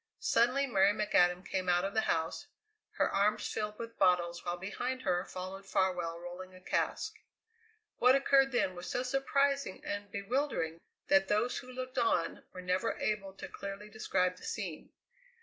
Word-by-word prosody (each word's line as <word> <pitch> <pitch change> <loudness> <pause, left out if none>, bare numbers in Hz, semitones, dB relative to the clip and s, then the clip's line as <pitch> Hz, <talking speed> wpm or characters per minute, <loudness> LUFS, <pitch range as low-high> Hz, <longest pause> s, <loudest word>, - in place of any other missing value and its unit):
Suddenly 275 - +3
Mary 200 -5 +4
McAdam 180 -4 +3
came 185 -1 -1
out 175 0 +3
of 195 - -3
the 220 - +3
house, 165 - -1 0.5
her - - +2
arms 210 +2 +1
filled 210 0 -3
with 230 -1 -8
bottles, 175 -1 +3
while 175 0 -2
behind 245 +8 -3
her 180 -2 +1
followed 185 +1 -6
Farwell 180 -4 0
rolling 180 +2 -8
a - - -12
cask. 185 - -1 0.9
What 250 +2 +6
occurred 275 0 +4
then 240 -7 +1
was 175 0 -7
so 245 - -1
surprising 275 -1 0
and 205 0 -4
bewildering 200 - -1 0.3
that 195 0 +5
those 215 +5 +1
who 255 - -11
looked 255 0 -4
on 225 -7 +1
were 185 - -8
never 185 +5 0
able 195 -2 -2
to - - -8
clearly 200 +1 -7
describe 185 -4 0
the - - -15
scene. 185 -8 -5
200 Hz, 165 wpm, -33 LUFS, 180-245 Hz, 0.9 s, What